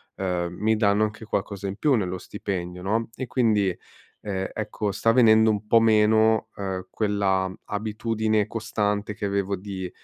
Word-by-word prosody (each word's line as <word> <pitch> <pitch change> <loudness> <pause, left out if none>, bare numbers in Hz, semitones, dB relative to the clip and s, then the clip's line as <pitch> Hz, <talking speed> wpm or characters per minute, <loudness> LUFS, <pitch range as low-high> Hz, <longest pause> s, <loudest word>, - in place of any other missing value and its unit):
uhm, 90 -2 -1
mi 110 +1 +2
danno 105 -1 +3
anche 110 +1 -3
qualcosa 100 -1 -3
in 100 +2 -5
più 150 -3 +2
nello 95 -4 -1
stipendio, 90 -2 -5
no, 110 +4 0
e 130 - -4
quindi, 110 -6 +2 0.5
ehm, 95 -2 -3
ecco 105 -1 -3
sta 115 +3 +2
venendo 110 -2 +6
un 105 0 -3
po' 115 +1 +6
meno, 110 0 +4
uhm, 95 -2 -4
quella 100 -3 0 0.2
abitudine 110 0 -1
costante 105 -2 -2
che - - -10
avevo 100 0 -1
di 95 -1 -6
105 Hz, 155 wpm, -25 LUFS, 95-110 Hz, 0.5 s, venendo